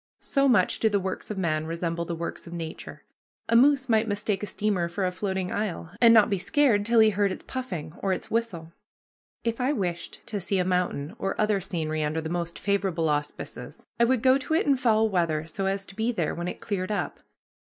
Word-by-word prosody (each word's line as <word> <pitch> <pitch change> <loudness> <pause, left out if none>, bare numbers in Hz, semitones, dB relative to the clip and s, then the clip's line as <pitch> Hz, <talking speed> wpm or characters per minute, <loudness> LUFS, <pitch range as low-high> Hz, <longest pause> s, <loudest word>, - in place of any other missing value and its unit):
So 275 -1 +2
much 200 -7 +3
do 220 - +3
the 205 -1 +1
works 190 0 -4
of 210 - -4
man 155 -4 0
resemble 170 0 -2
the 170 - -3
works 170 +1 -6
of 170 - -8
nature. 165 -2 -7 0.4
A 230 - +2
moose 265 +2 +5
might 225 -1 +3
mistake 205 -1 -1
a 210 - -3
steamer 200 -5 0
for 190 +2 -2
a 180 - 0
floating 190 -1 -2
isle, 195 -5 -3
and 235 -1 +8
not 220 -3 +7
be 195 - -1
scared 230 - +2
till 235 0 +4
he 220 0 +6
heard 200 0 +1
its - - -6
puffing 210 - -5
or 195 - 0
its 185 - -3
whistle. 180 -8 -2 0.7
If 230 +1 -1
I 265 +4 +2
wished 175 - -4
to 205 -3 -3
see 195 +2 -1
a 180 - +1
mountain 180 -2 -1
or 195 - -2
other 210 -2 +2
scenery 160 -4 -2
under 150 +2 -1
the 160 0 -4
most 170 -1 -3
favorable 190 -5 0
auspices, 150 0 -4
I 235 - +6
would 245 -1 +1
go 260 +1 +5
to 315 +4 -1
it - - +2
in 280 -2 +4
foul 225 -4 +3
weather 165 -6 0
so 190 +4 -3
as 195 0 -1
to 195 - -13
be 225 +3 0
there 175 -10 -1
when 175 +1 -4
it - - -6
cleared 190 -2 -2
up. 205 - -2
195 Hz, 225 wpm, -26 LUFS, 170-220 Hz, 0.7 s, and